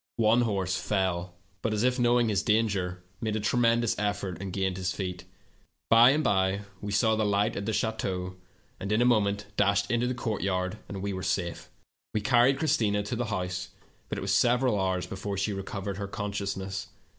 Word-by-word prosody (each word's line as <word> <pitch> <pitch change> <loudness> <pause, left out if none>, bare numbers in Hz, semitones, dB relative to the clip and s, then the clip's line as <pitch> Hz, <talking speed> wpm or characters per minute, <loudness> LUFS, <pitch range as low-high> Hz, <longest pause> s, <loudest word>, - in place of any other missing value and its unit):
"One 115 +1 +4
horse 95 -5 0
fell, 90 -3 -1 0.3
but, 110 -1 0
as 105 - 0
if 125 0 +2
knowing 120 -1 +3
his 100 -3 +1
danger, 100 -5 0 0.2
made 110 -2 -1
a - - 0
tremendous 115 +1 +2
effort 100 -4 -2
and 95 -1 -4
gained 95 -1 -1
his 95 -1 -1
feet. 90 -2 -5 0.7
By 115 +2 +8
and 150 +3 +2
by 95 -2 +2 0.2
we 105 0 -4
saw 110 +2 +3
the 110 - +1
light 105 +1 +1
at 100 - -4
the - - +1
chateau, 95 -4 -2 0.4
and 100 - -4
in 105 - +3
a - - +3
moment 105 -4 +2
dashed 100 0 +2
into 120 +1 +1
the 125 - -1
courtyard, 100 -3 -2
and 95 -1 -5
were 100 -2 -3
safe. 85 -3 -2 0.5
"We 105 - +1
carried 125 +3 +4
Christina 110 -10 +1
to 105 +4 -3
the 120 +1 -1
house, 90 -4 -3 0.4
but - - -3
it - - -4
was 95 +1 0
several 120 -1 +3
hours 95 -1 0
before 100 +1 -5
she 100 +2 0
recovered 95 0 -4
her 100 -1 -4
conscious 100 -1 -3
ness. 95 0 -5
100 Hz, 190 wpm, -28 LUFS, 95-110 Hz, 0.7 s, By